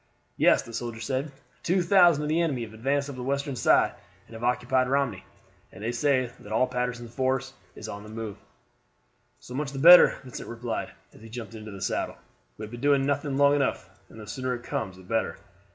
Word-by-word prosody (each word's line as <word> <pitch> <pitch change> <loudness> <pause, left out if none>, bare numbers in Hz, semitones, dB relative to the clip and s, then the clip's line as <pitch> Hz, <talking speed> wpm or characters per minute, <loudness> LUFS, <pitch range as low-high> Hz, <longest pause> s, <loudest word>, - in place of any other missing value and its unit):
"Yes," - - +4
the 115 - -11
soldier 115 -1 -4
said; 130 +5 -2 0.3
"2,000 175 -3 +4
of - - -2
the 160 +3 +2
enemy 140 -8 -1
have 110 -1 -9
advanced 140 +5 -1
up 140 - -7
the 130 - -7
Western 140 +1 -2
side 115 - +3 0.3
and - - -16
have 115 +1 -8
occupied 125 +1 +1
Romney, 135 -9 0 0.5
and 100 - -11
they 115 - -1
say 130 0 +1
that 105 - -12
all 115 +4 +3
Patterson's 125 -2 -4
force 130 +1 -1 0.2
is 110 - -8
on 100 -1 -7
the 105 - -11
move." 110 -2 -6 1.0
"So 125 - -12
much 140 +1 -3
the - - -6
better," 175 +6 +9
Vincent 125 -2 -8
replied, 115 0 -4 0.2
as - - -17
he 115 - -12
jumped 115 -1 -7
into 110 -1 -9
the 100 -2 -7
saddle. - - -2 0.4
"We 110 - -7
have 105 - -8
been 120 0 -8
doing 140 -1 +3
nothing 145 0 -1
long 140 0 +5
enough, 135 -9 -1 0.2
and 110 - -13
the 105 - -9
sooner 130 +4 -3
it 120 - -9
comes 95 -6 -4
the 95 - -14
better." 115 +5 -1
125 Hz, 210 wpm, -27 LUFS, 115-140 Hz, 1.0 s, better